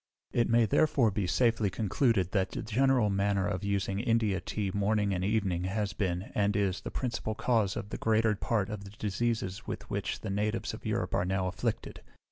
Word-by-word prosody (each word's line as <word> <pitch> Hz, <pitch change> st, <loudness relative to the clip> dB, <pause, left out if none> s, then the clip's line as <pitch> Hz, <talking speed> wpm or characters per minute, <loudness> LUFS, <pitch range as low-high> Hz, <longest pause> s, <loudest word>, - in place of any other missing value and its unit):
It 120 Hz, -, +1 dB
may 115 Hz, 0 st, +5 dB
therefore 120 Hz, 0 st, +3 dB
be 100 Hz, -2 st, -1 dB
safely 115 Hz, +1 st, +2 dB
concluded, 105 Hz, -1 st, +1 dB
that 95 Hz, -2 st, +1 dB
the -, -, -5 dB
general 125 Hz, -1 st, +2 dB
manner 100 Hz, 0 st, +1 dB
of 105 Hz, -1 st, -2 dB
using 100 Hz, -1 st, -1 dB
India 115 Hz, -4 st, +1 dB
tea 100 Hz, +1 st, -2 dB
morning 100 Hz, 0 st, +1 dB
and 90 Hz, 0 st, -1 dB
evening 95 Hz, -4 st, 0 dB
has 100 Hz, 0 st, -1 dB
been, 90 Hz, -1 st, -2 dB
and 105 Hz, 0 st, +1 dB
is, 100 Hz, -2 st, 0 dB
the -, -, -5 dB
principal 115 Hz, -3 st, -3 dB
cause 110 Hz, -5 st, +1 dB
of 105 Hz, -3 st, -5 dB
the -, -, -4 dB
greater 110 Hz, 0 st, +2 dB
part 105 Hz, 0 st, -1 dB
of 105 Hz, -2 st, -5 dB
the 100 Hz, -, -9 dB
diseases 105 Hz, -1 st, -2 dB
with -, -, -5 dB
which -, -, -2 dB
the -, -, -4 dB
natives 105 Hz, +3 st, -1 dB
of -, -, -7 dB
Europe -, -, -1 dB
are -, -, +2 dB
now 95 Hz, 0 st, 0 dB
afflicted. 90 Hz, -, -3 dB
105 Hz, 195 wpm, -30 LUFS, 95-110 Hz, -, may